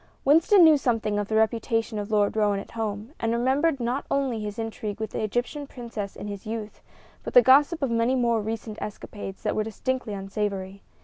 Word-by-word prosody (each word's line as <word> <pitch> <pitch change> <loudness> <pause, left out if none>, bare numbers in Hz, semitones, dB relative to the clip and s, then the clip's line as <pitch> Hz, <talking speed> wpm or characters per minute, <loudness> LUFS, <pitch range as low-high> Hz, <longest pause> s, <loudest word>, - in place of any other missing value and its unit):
Winston 330 +7 +6
knew 315 -2 +7
something 220 -5 0
of 205 - -2
the 220 - -2
reputation 225 0 +1
of 205 +1 -5
Lord 210 -1 +2
Roane 210 -2 +2
at 200 - -7
home, 220 +2 -4
and 225 - 0
remembered 265 +6 +1
not 245 +3 -1
only 270 -5 0
his 210 -1 -5
intrigue 220 -2 -4
with 220 -1 -4
the - - -3
Egyptian 245 +7 -2
princess 230 -6 -6
in - - -7
his 205 0 -7
youth, 220 -1 -6 0.4
but - - -7
the - - +10
gossip 290 +4 +5
of 265 - 0
many 230 +3 +2
more 235 -3 +2
recent 220 0 -5
escapades 205 -2 -7
that - - 0
were 215 - +1
distinctly 225 +1 -3
unsavory. 195 0 -4
225 Hz, 195 wpm, -26 LUFS, 210-255 Hz, 0.4 s, the